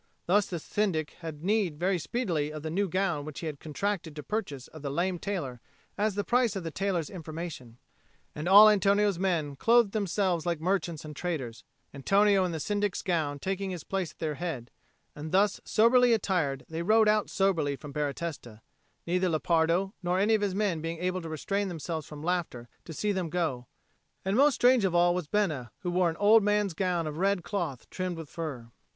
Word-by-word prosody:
Thus 200 +3 +3
the 175 - -4
Syndic 165 -3 -1
had 160 -3 -7
need 195 -5 +1
very 180 +2 +1
speedily 170 -6 -1
of 155 -1 -7
the 160 - -3
new 195 +3 0
gown 175 -5 0
which 150 -1 -7
he - - -5
had 150 -3 -5
contracted 165 0 -3
to 150 - -7
purchase 145 - -4
of 155 - -11
the 140 - -3
lame 175 +5 -1
tailor 145 - -4 0.3
as 210 -1 0
the 205 - 0
price 240 -2 +2
of 190 - -3
the 165 - -4
tailor's 180 -3 -1
information. 160 -8 -7 0.6
And 150 +3 -5
all 205 +3 +10
Antonio's 200 -2 +3
men 165 -7 0
clothed 230 - +4
themselves 195 -4 0
like 170 -2 -1
merchants 170 -2 -1
and 150 -1 -8
traders, 140 -10 -4 0.3
Antonio 195 +7 +3
in 180 - -2
the 160 - -4
Syndic's 205 +3 -1
gown 160 -6 0
taking 195 +5 -3
his 180 -4 -5
place 190 -4 -3
at - - -26
their 155 -2 -2
head; 145 -7 -5 0.4
and 150 +1 -7
thus 200 +2 +2
soberly 240 +2 +5
attired, 170 - 0
they 160 +1 -4
rode 215 +4 +4
out 210 0 +2
soberly 165 -8 +1
from 145 0 -10
Baratesta, 145 -6 -4 0.4
neither 180 +2 +1
Lepardo 165 +4 +1
nor 180 0 0
any 205 +4 +3
of 215 - +2
his 200 -2 -1
men 195 -6 0
being 165 +1 -4
able 180 +2 -2
to 165 - -7
restrain 195 +6 -2
themselves 165 -3 -5
from 150 -1 -9
laughter 170 -9 -2 0.2
to 165 - -8
see 210 +6 -1
them 185 -4 -2
go; 155 -8 -2 0.6
and 190 +1 +1
most 280 +2 +5
strange 245 -2 +4
of 185 -3 +1
all 175 0 +4
was 180 -4 -3
Bena, 155 -11 -1
who 180 -3 -2
wore 180 -1 +2
an 165 - -5
old 215 +3 +6
man's 205 -2 +1
gown 175 -1 0
of 155 +1 -5
red 195 -1 +1
cloth 175 - -4
trimmed 185 -2 -3
with 160 -3 -8
fur. 135 -9 -6
175 Hz, 200 wpm, -29 LUFS, 155-200 Hz, 0.6 s, all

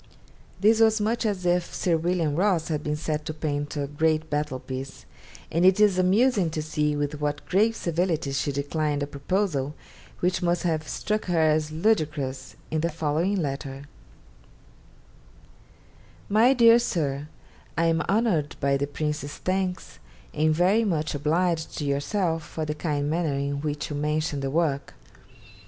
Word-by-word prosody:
This 220 +3 +4
was 220 -1 +4
much 225 +2 0
as 190 -4 -2
if 175 0 +1
Sir 175 -2 +1
William 165 -2 0
Ross 180 -2 +1
had 150 -2 -2
been 150 0 -1
set 150 0 -3
to 155 - -4
paint 145 -1 -3
a 145 - -1
great 155 +2 0
battle 150 -2 -1
piece; 130 +1 -7 0.5
and 165 +2 +1
it 190 +2 +5
is 205 -3 +4
amusing 195 0 +3
to 155 -1 -3
see 150 -1 0
with 145 0 -3
what 150 0 -2
grave 215 +5 +3
civility 165 -5 -1
she 135 +1 -1
declined 145 +1 -1
a - - 0
proposal 145 0 -1 0.4
which 180 0 0
must 175 0 +1
have 160 -3 -1
struck 215 0 -2
her 175 -2 0
as 155 -1 +2
ludicrous, 150 -8 -1 0.2
in 155 -1 0
the 170 - +1
following 165 +4 0
letter: 140 -5 -3 2.5
'MY 225 +6 +5
DEAR 235 -1 +7
SIR, 150 - -2 0.5
I 165 - +3
am 165 0 +2
honoured 195 -9 +1
by 140 0 +2
the 140 +1 -1
Prince's 150 0 -3
thanks 185 -1 -2 0.3
and 155 +1 +2
very 185 +8 +3
much 160 -7 -1
obliged 160 +3 0
to 150 - -2
yourself 160 +4 0
for 155 +1 -5
the 150 - -2
kind 150 -2 -2
manner 160 -2 0
in 140 0 -2
which 150 +1 -3
you - - -3
mention 150 0 -1
the 135 0 -2
work. 145 -2 -1
155 Hz, 160 wpm, -26 LUFS, 145-180 Hz, 2.5 s, DEAR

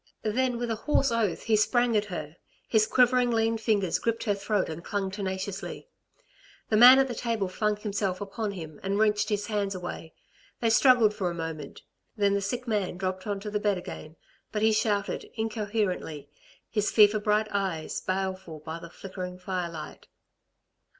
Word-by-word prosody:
Then 245 +3 0
with 240 -1 -2
a - - 0
hoarse 275 -3 +3
oath 225 -5 0
he 225 - +3
sprang 240 +2 +2
at 210 0 +2
her. 170 -5 -6 0.3
His 215 -2 +3
quivering 250 0 +4
lean 225 -1 +1
fingers 205 -5 +1
gripped 230 0 -1
her 210 - +1
throat 200 0 -1
and 160 +1 -6
clung 195 -1 -2
tenaciously. 190 - -5 0.8
The - - +4
man 245 +4 +10
at 270 0 +4
the 250 - -4
table 230 -4 -1
flung 210 +3 0
himself 200 -3 -2
upon 205 +1 -4
him 160 -5 -8
and 195 +1 -1
wrenched 210 -1 +2
his 205 -1 -1
hands 205 -2 -1
away; 175 -3 -7 0.4
they 230 -1 +2
struggled 235 -3 +5
for 190 -4 -1
a 170 - -5
moment, 160 -3 -6 0.3
then 200 -1 +3
the 200 - +1
sick 245 +6 -3
man 205 -5 -1
dropped 185 +1 -3
on 205 -1 -2
to 210 0 -5
the 210 - 0
bed 205 -2 +1
again; 160 -3 -8 0.4
but 210 0 -1
he 220 - +5
shouted 210 -2 0
incoherently, 210 -9 -2 0.4
his 210 -2 0
fever 215 -1 +5
bright 210 +1 +1
eyes 190 -6 -2
baleful 185 -3 -3
by 160 +2 -6
the 170 - -10
flickering 180 0 -7
firelight. 180 -3 -5
205 Hz, 175 wpm, -28 LUFS, 185-220 Hz, 0.8 s, man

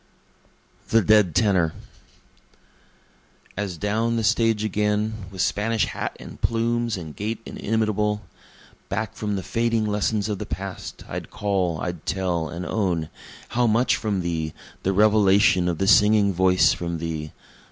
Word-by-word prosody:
The 115 -1 +4
Dead 105 -6 +4
Tenor 95 -7 +2 1.8
As 100 -4 -3
down 110 +5 0
the 115 - 0
stage 115 -1 +2
again, 105 +1 0 0.2
With 95 -1 -2
Spanish 110 +1 +1
hat - - -5
and - - -11
plumes, 115 -1 0
and 80 -4 -8
gait 110 +2 -3
inimitable, 105 -1 -1 0.7
Back 105 +1 -2
from 105 -1 -3
the 95 - -3
fading 115 -1 0
lessons 105 0 0
of 105 -3 -3
the - - -5
past, 95 -1 -6
I'd - - -6
call, 95 -5 -1
I'd 85 -3 -4
tell 90 -4 -1
and 85 +2 -5
own, 85 -5 -1 0.4
How 120 0 +2
much 115 +3 +3
from 100 -4 -1
thee! 80 -3 -3 0.3
the 95 - 0
revelation 100 -3 +4
of 85 - -2
the 95 - 0
singing 105 0 +5
voice 90 +1 +4
from 85 -1 -4
thee! 80 -2 -4
105 Hz, 140 wpm, -24 LUFS, 90-110 Hz, 1.8 s, singing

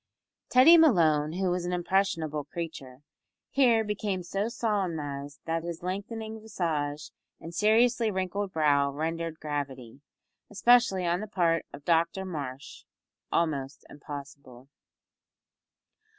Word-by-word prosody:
Teddy 275 +7 +8
Malone, 160 - +4
who 185 0 0
was 180 0 -1
an 175 - -3
impressionable 175 -4 0
creature, 145 -4 -7 0.5
here 240 -5 +4
became 205 -3 -3
so 195 +4 -2
solemnised 160 -11 -3
that 165 0 -1
his 170 0 -6
lengthening 220 +4 -5
visage 155 -8 -3 0.3
and 165 - -9
seriously 225 +4 +3
wrinkled 190 0 -2
brow 145 -3 +2
rendered 165 +2 -3
gravity 135 -4 -5 0.5
especially 210 -3 +3
on 175 +1 +1
the 215 - -5
part 170 -5 +1
of 140 0 -12
Dr 170 +3 +1
Marsh 140 -7 -7 0.5
almost 145 -5 -1
impossible. 140 -3 -10
170 Hz, 110 wpm, -28 LUFS, 145-200 Hz, 0.5 s, Teddy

